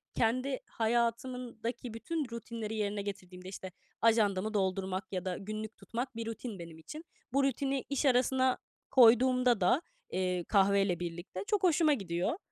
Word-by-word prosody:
kendi 255 +4 +1
hayatımdaki 235 0 -2
bütün 290 +6 -3
rutinleri 230 -1 -5
yerine 205 -1 -1
getirdiğimde, 185 -2 -7
işte, 190 -1 -7 0.3
ajandamı 215 -2 +3
doldurmak 190 -1 -1
ya 185 -1 -3
da 185 -1 -2
günlük 215 +2 -6
tutmak 245 +1 -5
bir 230 - -4
rutin 225 -3 -5
benim 165 -1 -9
için. 305 - -9 0.3
Bu 275 0 +3
rutini 275 0 0
iş 280 +1 0
arasına 260 0 +3 0.3
koyduğumda 250 -1 +6
da, 215 - +4 0.3
eee, 180 -1 0
kahveyle 195 -2 +3
birlikte 175 +2 -5
çok 415 -3 +1
hoşuma 325 -3 +4
gidiyor 180 - -1
225 Hz, 140 wpm, -32 LUFS, 190-255 Hz, 0.3 s, koyduğumda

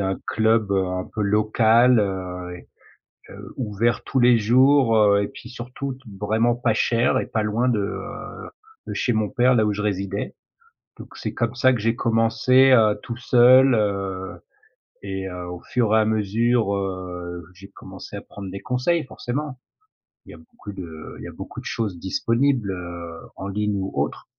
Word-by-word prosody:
a 95 - 0
un 95 - -2
club, 110 -2 +2
heu, 95 -1 +1
un 90 0 -3
peu 110 - -2
local, 110 +3 +4
heu 90 -2 -4
et - - -16 0.6
heu, - - -11
ouvert 115 -1 -1
tous 135 - -1
les 120 -1 +6
jours, 130 +2 +4
heu 100 -1 +4
et 100 - -2
puis 120 - -12
surtout 125 +2 -6
t 130 - -19 0.2
vraiment 115 +3 +2
pas 120 -3 0
cher 115 +1 +2
et - - -2
pas 115 -3 -1
loin 110 +4 0
de, 115 -4 +1
heu, 100 +1 -6 0.4
de - - -4
chez 120 - 0
mon 110 -2 0
père 125 +1 +3
là, 110 -2 +3
où 105 - +1
je 105 - -4
résidais. 100 -1 -3 0.6
Donc - - -10
c'est - - -4
comme 120 0 -2
ça 130 +2 +4
que 120 - -2
j'ai 115 +2 0
commencé, 115 +3 +3
heu, 110 -4 +4
tout 120 - -6
seul, 130 +1 +6
heu 100 -3 -2 0.6
et 95 -1 -4
heu, 90 -1 -7
au 90 -1 -7
fur 115 -3 +1
et 110 - +5
à 110 - +3
mesure, 110 0 +1
heu, 90 -3 -5
j'ai 100 +2 -13
commencé 95 +1 -11
à 100 - -7
prendre 100 -2 -9
des 100 - -6
conseils 130 +7 0
forcément! 130 +2 -5 0.7
Il - - -12
y - - -11
a - - -13
beaucoup 235 - -12
de 80 -5 -9
il - - -9
y - - -6
a - - -9
beaucoup - - -8
de - - -15
choses 105 -6 -3
disponibles, 115 +3 0
heu, 85 -2 -7 0.2
en 95 - -6
ligne 105 +1 -1
ou 95 0 -3
autre. - - -2
110 Hz, 190 wpm, -23 LUFS, 95-120 Hz, 0.7 s, les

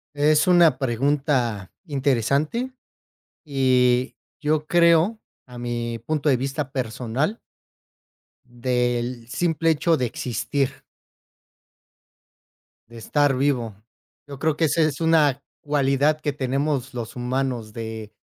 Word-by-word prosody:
Es 150 +3 +3
una 170 -7 +5
pregunta 130 - 0
interesante 140 - 0 0.7
y 130 -3 +2 0.2
yo 155 0 0
creo, 170 +6 +4 0.3
a 125 -1 -11
mi 120 -1 -3
punto 150 +4 -1
de 135 - +4
vista 135 +2 -3
personal 130 - -2 1.1
del 120 -1 -2
simple 165 +4 +1
hecho 160 +2 +2
de 125 - 0
existir. 130 +3 -2 2.1
Estar 135 +4 0
vivo. 125 -6 0 0.5
Yo 140 -2 -9
creo, 155 0 +1
que 160 - +2
esa 160 +2 +1
es 155 0 0
una 150 -4 +3 0.2
cualidad 145 +1 +1
que 150 -2 -1
tenemos 135 -1 -1
los 115 -2 -6
humanos 125 -3 -2
de 110 -1 -6
135 Hz, 105 wpm, -23 LUFS, 120-150 Hz, 2.1 s, una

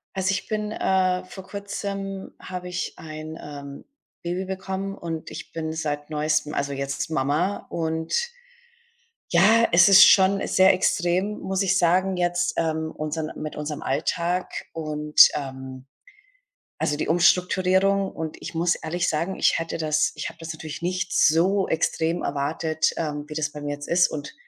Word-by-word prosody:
Also, 190 0 0
ich 195 - -3
bin, 210 -1 -2
äh 185 -3 +1
vor 185 +1 -10
Kurzem 200 -1 -5
habe 180 -1 -7
ich 180 0 -3
ein, 155 0 -8
ähm, 140 -1 -9 0.4
Baby 175 +2 -3
bekommen 190 +1 -4
und 165 -4 -6
ich - - -8
bin 160 -1 -4
seit 145 -2 -3
Neuestem, 150 0 0
also, 140 0 -1
jetzt 140 +2 -3
Mama. 160 +6 0
Und 160 -1 -3 1.2
ja, 215 +7 +5
es 175 +2 +7
ist 195 0 +10
schon 195 0 +5
sehr 190 0 +5
extrem, 185 +2 0
muss 190 +1 -1
ich 195 0 +2
sagen 185 +2 +2
jetzt, 175 0 0
ähm, 160 -1 -1
unseren 155 +1 -4
mit 155 0 -5
unserem 150 0 -5
Alltag 170 +6 -1 0.2
und, 150 -1 +5
ähm, 130 -2 -6 0.9
also, 150 - 0
die - - -2
Umstrukturierung. 185 +3 +3
Und 160 -1 -6
ich - - -7
muss 170 +1 +2
ehrlich 175 +3 -2
sagen, 165 +5 -1
ich - - +2
hätte 165 0 -4
das 155 -1 +1
ich - - -4
habe 165 - -16
das 165 0 -6
natürlich 155 0 -8
nicht 180 +1 -2
so 185 +5 +3
extrem 160 +1 0
erwartet, 155 +3 -1
ähm, 150 -2 -3
wie 150 - -8
das 150 -2 -1
bei 150 - -8
mir 145 0 -3
jetzt 145 0 -9
ist. 175 +1 +4
Und 145 -2 -6
165 Hz, 160 wpm, -24 LUFS, 155-185 Hz, 1.2 s, ist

